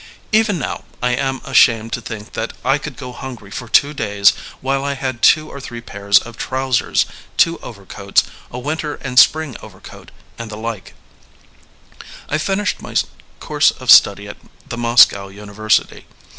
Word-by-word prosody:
Even 215 -3 +2
now, 140 - -5
I 125 0 0
am 135 +1 -2
ashamed 115 -1 +3
to 120 - -2
think 110 -2 -8
that 110 +1 -4
I 135 +2 +2
could 145 -1 -8
go 130 -3 -7
hungry 120 -5 -9
for 120 +3 -7
two 145 +6 +3
days 100 -6 +3 0.3
while 135 +1 -1
I 140 0 -2
had 130 -3 -4
two 155 0 +4
or 140 - -8
three 120 -3 -8
pairs 100 -3 +1
of 120 -1 -4
trousers, 130 -2 0 0.3
two 165 0 +3
overcoats, 100 -2 -2 0.3
a 120 - -8
winter 150 +3 -3
and 125 -1 +1
a - - +13
spring 155 -5 +1
overcoat, - - -13 0.3
and 115 -1 -6
the 105 - -7
like* 110 -2 -6 1.3
I 155 - -1
finished 195 +4 -1
my - - -10 0.4
course - - +2
of - - 0
study - - +6
at - - -9 0.3
the - - -5
Moscow 115 -4 +4
University. 105 +2 -2
125 Hz, 165 wpm, -18 LUFS, 110-140 Hz, 1.3 s, a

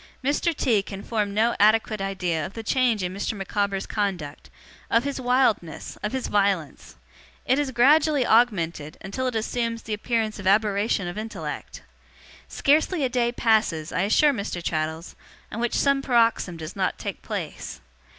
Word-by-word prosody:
Mr. 290 +5 +1
T. 225 -8 +2
can 195 0 -8
form 210 -3 -1
no 225 +3 +2
adequate 215 0 +3
idea 180 -5 -1
of 190 - -6
the 225 - -6
change 235 -3 +1
in 180 0 -3
Mr. 200 +3 -2
Micawber's 200 0 -2
conduct, 185 -9 -3 0.4
of 230 +1 +3
his 280 -2 -3
wildness, 245 - 0
of 210 - -2
his 260 -1 -2
violence. 195 - -1 0.5
It 260 +3 +2
has 290 -2 0
gradually 285 +2 +4
augmented, 170 -11 +1
until 255 +7 -3
it 250 - -3
assumes 230 +1 -2
the 220 - -4
appearance 220 0 -1
of 190 - -4
aberration 205 -1 +2
of 175 +4 -5
intellect. 220 +1 -6 0.6
Scarcely 310 +3 +2
a 260 - +1
day 240 -1 +1
passes, 215 -10 +1
I - - 0
assure 280 +9 +4
Mr. 200 -6 -4
Traddles, 160 +1 -3 0.4
on 220 - -5
which 240 0 -1
some 275 -1 +2
paroxysm 230 -8 +2
does 155 -1 -7
not - - -1
take - - -6
place. - - -6
215 Hz, 160 wpm, -25 LUFS, 195-245 Hz, 0.6 s, gradually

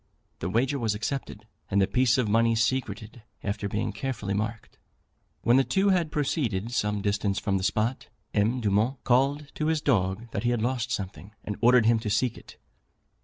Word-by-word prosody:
The 90 - -3
wager 130 +7 +1
was 110 -3 0
accepted, 135 +6 -4 0.2
and 100 - +2
the 95 - +5
piece 125 +4 +2
of 125 -4 +1
money 115 +2 +3
secreted, 115 -1 -2 0.2
after 100 0 -2
being 105 - -2
carefully 105 -7 -3
marked. 110 +2 -4 0.6
When 120 +2 +5
the 135 - +5
two 195 +7 +2
had 175 -5 +2
proceeded 120 - -1
some 105 -4 -1
distance 100 -1 0
from 100 -1 0
the - - -5
spot, 110 +5 0 0.3
M. 110 +5 +1
Dumont 110 +5 +1
called 140 +4 +1
to 155 - -2
his 160 -1 +2
dog 110 -5 0
that - - -2
he 120 - +1
had 120 -2 0
lost 125 0 -1
something, 100 -1 -5
and 105 - -4
ordered 120 -1 +5
him 115 0 +4
to 110 -1 -4
seek 110 +3 +1
it. - - -14
115 Hz, 185 wpm, -27 LUFS, 105-130 Hz, 0.6 s, the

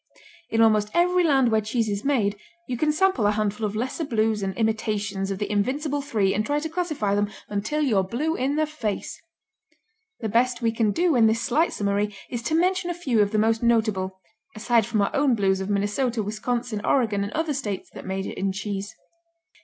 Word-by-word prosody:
In 225 - +2
almost 215 -2 +4
every, 360 +1 +3
land 270 -7 +3
where 220 0 +3
cheese 220 +1 -1
is 205 -1 -2
made 225 -8 +1 0.3
you 255 - -2
can 300 +5 +1
sample 310 - +2
a - - +3
handful 210 0 -1
of 205 - -6
lesser 255 +8 -2
Blues 220 -5 0
and 190 -1 -2
imitations 210 -3 -1
of 195 - -2
the 205 +1 -3
invincible 275 +8 0
three 215 -9 +1
and 215 - 0
try 290 +6 0
to 320 +2 -4
classify 310 - -1
them, 205 0 +1 0.2
until 215 +10 -1
you're 220 -9 +3
blue 280 - -1
in 270 +3 0
the 310 0 +2
face. 270 -10 -4 1.0
The 225 - -2
best 240 +3 +2
we 230 - +3
can 225 -1 +1
do 335 - +2
in 230 -2 +5
this 225 +1 +1
slight 300 +6 +2
summary 205 0 -1 0.2
is 240 -2 -3
to 315 - +1
mention 360 +1 +1
a 350 - -2
few 260 -11 +1
of 205 - +2
the 215 - 0
most 225 +1 +2
notable, 215 -5 +1 0.4
aside 225 0 +2
from 215 -3 +1
our - - -2
own 275 -3 +3
Blues 190 -2 +1
of 190 - -4
Minnesota, 210 +4 0
Wisconsin, 220 +1 -3
Oregon 220 -7 +1
and 200 - -4
other 320 -1 -1
states 210 -8 -4
that - - -9
major 190 0 -3
in 195 0 -2
cheese. 200 0 -5
225 Hz, 205 wpm, -24 LUFS, 205-275 Hz, 1.0 s, in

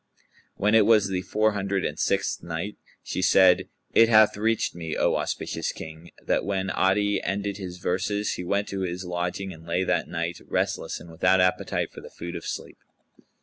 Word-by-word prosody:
When 105 +2 +1
it 110 -2 +6
was 110 -3 +5
the 95 -1 -1
Four 110 +3 +1
Hundred 100 -1 -1
and 75 - -3
Sixth 100 0 0
Night, 85 +5 -4 0.3
She - - -3
said, 95 0 +5 0.2
It 115 0 +6
hath 110 -1 +6
reached 110 +2 0
me, 80 -2 -5
O - - +2
auspicious - - -2
King, 80 +2 -10
that - - 0
when 95 -1 -1
Adi 100 +2 +2
ended 100 0 -2
his 90 -3 -7
verses 100 +4 -1
he - - -5
went 100 +3 0
to 100 - -4
his 90 0 -3
lodging 90 +2 -3
and 80 -1 -14
lay 90 +2 +1
that - - 0
night 85 +1 -3
restless - - -1
and 85 - -12
without 90 +3 +3
appetite 90 0 +1
for - - -10
the - - -11
food 85 +1 -7
of 85 - -6
sleep. - - -6
95 Hz, 190 wpm, -26 LUFS, 90-100 Hz, 0.3 s, it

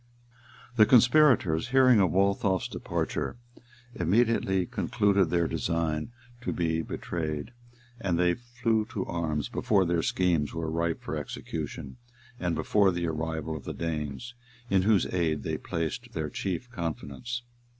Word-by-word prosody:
] 120 0 -23
The 110 -2 +7
conspirators, 120 - +5
hearing 130 -2 +5
of 95 -3 +4
Waltheof's 95 +1 +1
departure, - - -3 0.6
immediately 95 0 +2
concluded 100 -2 +1
their 85 -1 +2
design 80 +2 -1 0.3
to - - -2
be 80 -1 0
betrayed; 80 +1 -4 0.5
and 95 -6 0
they 90 0 +3
flew 120 -1 -1
to 95 - -2
arms 80 -5 -2
before 100 -3 +2
their 85 -1 +1
schemes 85 -4 +1
were 80 -1 -2
ripe 85 0 -1
for - - -4
execution, 65 - -6 0.4
and 85 -2 -1
before 95 +5 +3
the 85 -1 -2
arrival 80 0 -3
of 75 - -7
the - - -5
Danes, 80 - -4 0.4
in 95 -1 +4
whose 105 0 +3
aid 80 -4 0
they - - -2
placed 80 -2 -4
their - - -3
chief 95 +6 -3
confidence. 105 - -4
90 Hz, 140 wpm, -28 LUFS, 80-110 Hz, 0.6 s, The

